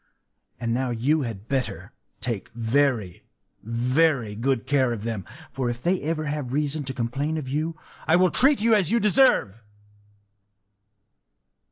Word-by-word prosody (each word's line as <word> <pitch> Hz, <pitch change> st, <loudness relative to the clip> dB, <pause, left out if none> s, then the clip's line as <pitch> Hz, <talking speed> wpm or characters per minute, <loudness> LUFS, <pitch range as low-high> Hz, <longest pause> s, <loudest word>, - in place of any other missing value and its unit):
And 115 Hz, -1 st, -1 dB
now 130 Hz, +1 st, -1 dB
you 130 Hz, +7 st, +1 dB
had 115 Hz, -5 st, -6 dB
better 135 Hz, -2 st, -3 dB, 0.3 s
take 115 Hz, -5 st, -4 dB
very, 115 Hz, -5 st, 0 dB, 0.4 s
very 125 Hz, +1 st, +1 dB
good 120 Hz, +3 st, -1 dB
care 135 Hz, -4 st, +2 dB
of 110 Hz, -3 st, -6 dB
them; 110 Hz, -4 st, -4 dB, 0.3 s
for 130 Hz, -2 st, -2 dB
if 120 Hz, 0 st, -6 dB
ever 165 Hz, -3 st, 0 dB
they 150 Hz, -, -3 dB
have 145 Hz, -4 st, -4 dB
reason 150 Hz, +1 st, -1 dB
to 130 Hz, -, -4 dB
complain 135 Hz, +6 st, -2 dB
of 150 Hz, -4 st, -5 dB
you, 155 Hz, +4 st, -2 dB, 0.3 s
I 160 Hz, -, +5 dB
will 180 Hz, 0 st, +4 dB
treat 275 Hz, -1 st, +5 dB
you 230 Hz, +1 st, +4 dB
as 195 Hz, -6 st, +3 dB
you 235 Hz, -, +2 dB
deserve! 205 Hz, -, +3 dB
135 Hz, 150 wpm, -24 LUFS, 115-155 Hz, 0.4 s, I